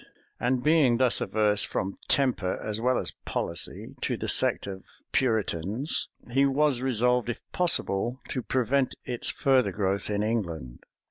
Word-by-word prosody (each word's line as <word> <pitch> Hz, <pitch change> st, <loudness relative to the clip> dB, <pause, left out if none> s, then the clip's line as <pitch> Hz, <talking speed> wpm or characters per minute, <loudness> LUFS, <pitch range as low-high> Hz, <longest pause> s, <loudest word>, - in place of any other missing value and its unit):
And 125 Hz, +1 st, 0 dB
being 150 Hz, -6 st, +4 dB
thus 125 Hz, -1 st, +4 dB
averse, 105 Hz, -1 st, +2 dB
from 95 Hz, +1 st, -3 dB
temper 125 Hz, -9 st, +1 dB
as 110 Hz, +1 st, -3 dB
well 125 Hz, +1 st, +2 dB
as -, -, -2 dB
policy, 85 Hz, -1 st, -4 dB
to -, -, -1 dB
the -, -, -4 dB
sect -, -, +2 dB
of 95 Hz, -1 st, -7 dB, 0.3 s
Puritans, 110 Hz, -, 0 dB, 0.2 s
he 135 Hz, +3 st, +3 dB
was 140 Hz, -1 st, +2 dB
resolved, 125 Hz, -1 st, +1 dB
if 120 Hz, -, -3 dB
possible, 125 Hz, -, +1 dB
to 130 Hz, -, -2 dB
prevent 130 Hz, +2 st, 0 dB
its 120 Hz, -2 st, -2 dB
further 130 Hz, -7 st, +2 dB
growth 100 Hz, +1 st, -1 dB
in 105 Hz, 0 st, 0 dB
England. 85 Hz, -, -3 dB
120 Hz, 145 wpm, -27 LUFS, 100-130 Hz, 0.3 s, being